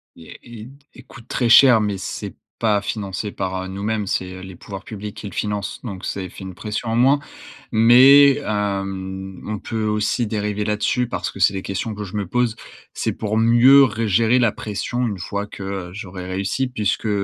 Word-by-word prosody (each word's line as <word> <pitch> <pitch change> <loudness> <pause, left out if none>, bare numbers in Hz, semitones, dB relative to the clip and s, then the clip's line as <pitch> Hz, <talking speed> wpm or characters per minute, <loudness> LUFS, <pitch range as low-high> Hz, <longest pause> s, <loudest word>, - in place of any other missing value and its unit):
et 80 - -13 0.2
et - - -8
t - - -15 0.2
et 130 - -14
coûte 115 -1 -15
très 120 -2 0
cher 120 -1 +7
mais 105 -2 -1
c'est 95 - -6 0.3
pas 105 -3 +2
financé 100 -1 -4
par, 95 -1 -3
heu, - - -6
nous-mêmes 100 +2 -3
c'est 95 0 -3
les 95 -1 -10
pouvoirs 95 +2 -9
publics 105 -1 -8
qui 105 - -7
le 100 - -9
finance 105 -1 -3
donc 100 -6 -6
c'est 95 -2 -4
fi 95 - -11
une 95 -1 -8
pression, 105 +3 -5
en - - 0
moins. 135 +4 +4 0.5
Mais 130 +5 +7
hem, 95 -4 -4
on 105 -1 -4
peut 110 +1 -4
aussi 105 +3 0
dériver 105 -1 -2
là-dessus 105 +4 0
parce - - -3
que 100 - -9
c'est 85 - +5
des 95 - -3
questions 100 +4 -4
que 105 0 -6
je 95 - -9
me 105 -1 -1
pose. 120 +4 0 0.4
C'est - - -2
pour 110 0 -3
mieux 120 +5 +6
re 115 -2 0
gérer 115 +5 +3
la 115 -4 +2
pression 120 +4 -3
une 105 -5 -3
fois 100 +4 -4
que 95 -3 -6
j'aurais 90 -2 -8
réussi 100 +8 -2
puisque 110 -2 -1
105 Hz, 200 wpm, -21 LUFS, 95-115 Hz, 0.5 s, cher